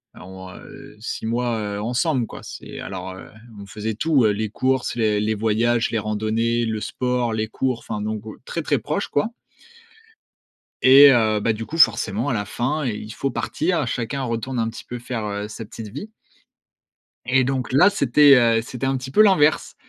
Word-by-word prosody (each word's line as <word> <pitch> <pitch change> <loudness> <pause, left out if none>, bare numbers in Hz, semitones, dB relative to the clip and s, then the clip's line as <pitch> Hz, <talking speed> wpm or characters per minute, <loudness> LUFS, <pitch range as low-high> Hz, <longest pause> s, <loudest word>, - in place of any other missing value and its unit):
on, 95 0 -11
heu, - - -13
6 - - -5
mois, 120 +1 -1
heu, 105 -1 -4
ensemble, 125 +2 0
quoi. - - -10
C'est - - -9
alors, 95 +1 -6
heu, 95 - -11 0.3
on 100 - -9
faisait 105 +2 -5
tout, 140 0 +2
heu, 105 - +4
les 105 +1 -2
courses, 130 +1 -1
les 110 -3 +1
les 105 +1 0
voyages, 115 +2 +1
les 115 - 0
randonnées, 110 +3 -1
le 110 -1 -2
sport, 125 +1 -1
les 110 0 -1
cours, 125 +2 -2
enfin 105 - -5
donc, 110 0 -4 0.2
très, - - -4
très - - 0
proches - - -3
quoi. 145 +10 0 1.5
Et 140 +2 +9
heu, 110 -3 +2
bah, 110 +2 +1
du 110 +1 -6
coup, 165 - -6
forcément 120 -5 +3
à - - 0
la 105 -3 -2
fin, 140 +8 -2
il 110 -4 -3
il 105 - -9
faut 135 +3 -2
partir. 160 +2 -1
Chacun 130 +4 -3
retourne 120 +1 -3
un 115 0 0
petit 115 - -9
peu 125 0 -7
faire, 120 -2 -4
heu, 105 0 -4
sa 115 - -8
petite 110 +1 -9
vie. 145 - -8 1.2
Et 130 +1 +3
donc, 130 0 -2
là, 180 +9 +6
c'était, 145 - +5
heu, 115 -2 +3
c'était 125 +2 -6
un 135 0 0
petit 130 +1 -7
peu 215 - +5
l'inverse. 180 -8 +3
115 Hz, 195 wpm, -22 LUFS, 110-130 Hz, 1.5 s, Et